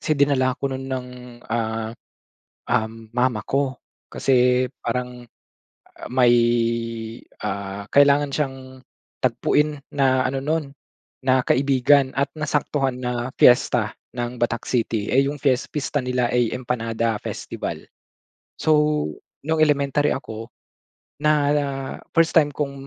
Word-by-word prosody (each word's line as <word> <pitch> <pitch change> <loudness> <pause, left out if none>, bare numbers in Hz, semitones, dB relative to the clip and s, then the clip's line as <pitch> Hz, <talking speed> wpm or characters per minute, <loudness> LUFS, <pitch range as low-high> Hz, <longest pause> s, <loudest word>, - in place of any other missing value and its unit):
kasi 155 - 0
dinala 135 -3 +2
ko 135 -1 -2
no'n 130 0 -5
ng, 130 -1 -4 0.4
ah, 110 -1 -2 0.8
um, 110 0 -1
mama 125 -3 +2
ko. 135 -2 -1 0.3
Kasi, 125 -1 +3 0.2
parang, 125 +1 -3 0.7
ah, - - -8
may, 125 -2 +5 1.1
ah, 100 0 -5
kailangan 140 0 +4
siyang 135 -1 -2 0.7
tagpuin 145 +4 +1 0.2
na 130 -2 +3
ano 135 0 -3
no'n 155 -1 -1 0.6
na 130 0 +4
kaibigan 135 0 +3
at 140 +1 0
nasaktuhan 145 -3 -1
na 125 0 -3
piyesta 120 -3 +4 0.2
ng 120 +1 -3
Batak 120 0 -2
City. 115 -4 0
Eh, 135 +2 +4
'yong 145 0 -3
fies 135 -2 +2
pista 145 -2 -2
nila 125 -1 0
ay 120 -2 +1
empanada 115 -2 -1
festival. - - -5 0.7
So, 150 - +2 0.4
nung 160 0 +1
elementary 145 -1 +2
ako 115 -3 -5 0.7
na 150 0 +4 0.8
first 165 -1 +4
time 155 -3 +5
kong 140 -1 -3
130 Hz, 120 wpm, -22 LUFS, 120-140 Hz, 1.1 s, may